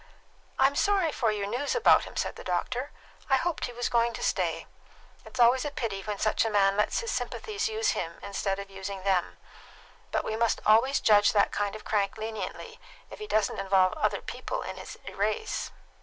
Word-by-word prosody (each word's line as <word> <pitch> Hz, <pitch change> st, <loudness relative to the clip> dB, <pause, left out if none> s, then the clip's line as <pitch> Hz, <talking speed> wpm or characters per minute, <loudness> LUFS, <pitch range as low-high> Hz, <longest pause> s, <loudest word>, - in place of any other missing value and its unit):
"I'm 270 Hz, +1 st, +4 dB
sorry 390 Hz, -4 st, +2 dB
for 230 Hz, -6 st, +1 dB
your 205 Hz, -1 st, -2 dB
news 245 Hz, +8 st, -2 dB
about 480 Hz, -, +5 dB
him," -, -, -11 dB
said -, -, -1 dB
the -, -, -10 dB
doctor. 245 Hz, +10 st, -2 dB, 0.4 s
"I 270 Hz, -, +5 dB
hoped 335 Hz, +5 st, -1 dB
he 245 Hz, -, -6 dB
was 245 Hz, 0 st, -2 dB
going 235 Hz, 0 st, +2 dB
to -, -, -6 dB
stay. -, -, 0 dB, 0.6 s
It's 260 Hz, -, -10 dB
always 245 Hz, +2 st, +5 dB
a 295 Hz, -, -2 dB
pity 230 Hz, -8 st, -3 dB
when 210 Hz, 0 st, -4 dB
such 215 Hz, +2 st, +1 dB
a 225 Hz, -, 0 dB
man 200 Hz, -2 st, +3 dB
lets 210 Hz, -, +1 dB
his 465 Hz, -, -3 dB
sympathies 430 Hz, 0 st, -2 dB
use 440 Hz, -1 st, 0 dB
him 165 Hz, -1 st, -4 dB
instead 200 Hz, -1 st, -2 dB
of 200 Hz, 0 st, -8 dB
using 195 Hz, 0 st, -6 dB
them. 190 Hz, -3 st, 0 dB, 0.7 s
But -, -, 0 dB
we 220 Hz, -, -2 dB
must 230 Hz, +1 st, +1 dB
always 230 Hz, +6 st, +4 dB
judge 205 Hz, -1 st, +5 dB
that 205 Hz, -, +3 dB
kind 205 Hz, 0 st, -2 dB
of 215 Hz, -, -10 dB
crank 200 Hz, -2 st, 0 dB
leniently, 220 Hz, -3 st, -6 dB, 0.3 s
if -, -, -9 dB
he 425 Hz, -, -6 dB
doesn't 215 Hz, -, +1 dB
involve 190 Hz, -1 st, +3 dB
other -, -, 0 dB
people -, -, -5 dB
in -, -, -6 dB
his -, -, -9 dB
erase." 450 Hz, -2 st, -2 dB
220 Hz, 200 wpm, -28 LUFS, 200-270 Hz, 0.7 s, about